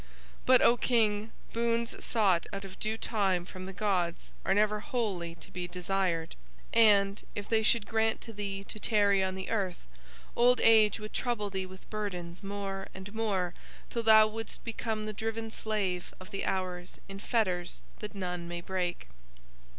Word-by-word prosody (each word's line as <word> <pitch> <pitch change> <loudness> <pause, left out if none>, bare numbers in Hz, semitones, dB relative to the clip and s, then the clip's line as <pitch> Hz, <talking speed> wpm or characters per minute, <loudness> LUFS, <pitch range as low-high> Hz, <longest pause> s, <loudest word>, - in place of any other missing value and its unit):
But, 255 -1 +7
O 240 - +6
King, 220 -3 +2 0.2
boons 235 0 0
sought 195 -7 +2
out 195 0 -5
of 190 -1 -10
due 215 +1 -1
time 195 -6 +1
from 185 +1 -8
the - - -5
gods 180 -4 -1
are 190 - +2
never 210 0 +3
wholly 195 -8 -2
to 165 - -13
be 180 -1 -4
desired, 180 -2 -1 0.4
and, 205 -3 +5
if 205 0 -4
They 225 -1 +3
should 220 0 +3
grant 220 0 +1
to 225 - -9
thee 200 -1 -4
to 215 - -8
tarry 205 -3 +3
on 190 0 -1
the 190 0 -5
earth, 195 -5 0 0.6
old 245 +1 +5
age 220 -2 +6
would 215 0 -8
trouble 210 -5 -1
thee 190 -1 -2
with 185 0 -13
burdens 180 -5 -4
more 195 -1 -4
and 190 +2 -8
more 195 -6 0 0.4
till 235 - -1
thou 220 -1 +8
wouldst 220 0 -5
become 225 -1 -3
the 215 - -4
driven 225 +1 -3
slave 200 -6 -2
of 185 - -12
the 195 - -2
hours 180 -1 -3
in 195 0 -8
fetters 185 -6 0 0.2
that 210 -1 -6
none 180 -3 -3
may 175 0 -4
break." 180 - -2
200 Hz, 170 wpm, -31 LUFS, 185-220 Hz, 0.6 s, thou